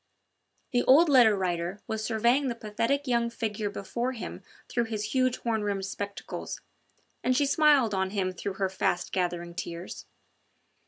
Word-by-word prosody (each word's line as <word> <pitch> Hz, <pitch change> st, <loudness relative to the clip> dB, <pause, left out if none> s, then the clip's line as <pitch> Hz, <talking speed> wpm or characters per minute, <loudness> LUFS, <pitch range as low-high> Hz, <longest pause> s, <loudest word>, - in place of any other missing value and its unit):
The 245 Hz, -, +3 dB
old 305 Hz, +6 st, +7 dB
Letter 245 Hz, -6 st, +6 dB
Writer 175 Hz, +1 st, -2 dB
was 220 Hz, -1 st, -3 dB
surveying 235 Hz, +5 st, +2 dB
the 240 Hz, -, -2 dB
pathetic 230 Hz, +6 st, -1 dB
young 235 Hz, -2 st, +1 dB
figure 220 Hz, -3 st, -3 dB
before 235 Hz, +5 st, -3 dB
him 235 Hz, -, -7 dB, 0.3 s
through 240 Hz, -1 st, 0 dB
his 215 Hz, -1 st, -4 dB
huge 255 Hz, -1 st, +2 dB
horn 225 Hz, -2 st, -1 dB
rimmed 200 Hz, -2 st, -1 dB
spectacles, 200 Hz, +1 st, -5 dB, 0.6 s
and 255 Hz, 0 st, +2 dB
she 290 Hz, -, +3 dB
smiled 280 Hz, -5 st, +4 dB
on 190 Hz, 0 st, 0 dB
him 190 Hz, -2 st, -1 dB
through 185 Hz, +2 st, -4 dB
her 195 Hz, 0 st, 0 dB
fast 185 Hz, -1 st, -1 dB
gathering 175 Hz, -2 st, -2 dB
tears. 170 Hz, +1 st, -6 dB
220 Hz, 155 wpm, -28 LUFS, 195-245 Hz, 0.6 s, old